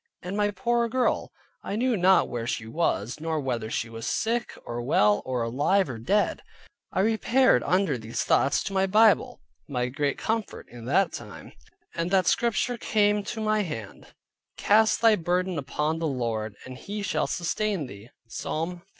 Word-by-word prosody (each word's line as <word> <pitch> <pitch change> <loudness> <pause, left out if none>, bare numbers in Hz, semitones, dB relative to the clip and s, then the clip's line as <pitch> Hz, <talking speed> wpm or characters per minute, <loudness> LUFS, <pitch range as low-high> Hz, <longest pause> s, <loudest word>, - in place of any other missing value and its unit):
And 180 +2 -4
my 205 0 +2
poor 235 +2 0
girl, 255 +1 0 0.3
I 200 - -4
knew 245 +2 +1
not 190 0 +4
where 120 -2 -4
she 110 - -2
was, 115 - -1
nor 160 0 -2
whether 120 -5 -3
she 115 - -2
was 115 0 -7
sick, 235 +2 -1
or 120 0 -4
well, 105 -4 +3
or 125 -2 -1
alive, 145 +8 +1
or 115 - -7
dead. 205 - +1 0.5
I - - +1
repaired 225 - +3
under 175 -4 +1
these 110 +1 -3
thoughts 135 - +2
to 195 - -5
my 190 0 +2
Bible 215 +2 +3 0.3
(my 125 -2 -1
great 140 +2 -1
comfort 225 -1 -3
in 120 -1 -11
that 170 +7 +2
time) 105 -3 -9 0.4
and 170 +1 -2
that 190 -1 +3
Scripture 240 +1 +1
came 210 -1 +2
to 225 - -5
my 215 0 +1
hand, 115 - -7 0.5
"Cast 215 +1 +3
thy 225 -2 +6
burden 180 -1 -1
upon 150 +3 -2
the 165 - -1
Lord, 115 -6 -2
and 130 0 -9
He 205 +1 -5
shall - - 0
sustain 185 -1 -1
thee" 105 -1 -11 0.2
(Psalm 160 +7 -3
55. 175 +3 -22
170 Hz, 175 wpm, -26 LUFS, -, 0.5 s, thy